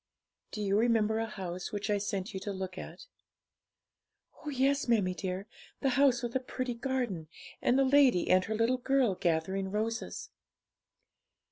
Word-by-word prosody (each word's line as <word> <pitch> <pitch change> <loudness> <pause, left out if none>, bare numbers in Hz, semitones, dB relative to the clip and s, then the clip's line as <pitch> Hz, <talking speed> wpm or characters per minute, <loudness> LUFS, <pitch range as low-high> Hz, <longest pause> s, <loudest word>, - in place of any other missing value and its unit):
'Do 210 - -4
you 200 +1 +2
remember 225 -2 +2
a 225 - -1
house 185 -4 -5
which 205 -1 -3
I 205 - +2
sent 200 0 -3
you 190 - -3
to 200 +2 -4
look 190 -1 -5
at?' - - -9 1.3
'Oh 300 - -8
yes, 275 0 +1
mammie 205 -6 +2
dear 185 +1 -4 0.4
the 270 - +2
house 260 -1 +3
with 240 0 -4
a - - +3
pretty 255 -1 -4
garden, 235 - -2 0.3
and 255 +2 +3
a - - +5
lady 265 -8 +4
and 185 0 +5
her 220 - -2
little 230 +3 +2
girl 260 -4 +2
gathering 185 +2 -1
roses.' 225 +3 -3
220 Hz, 160 wpm, -31 LUFS, 190-255 Hz, 1.3 s, a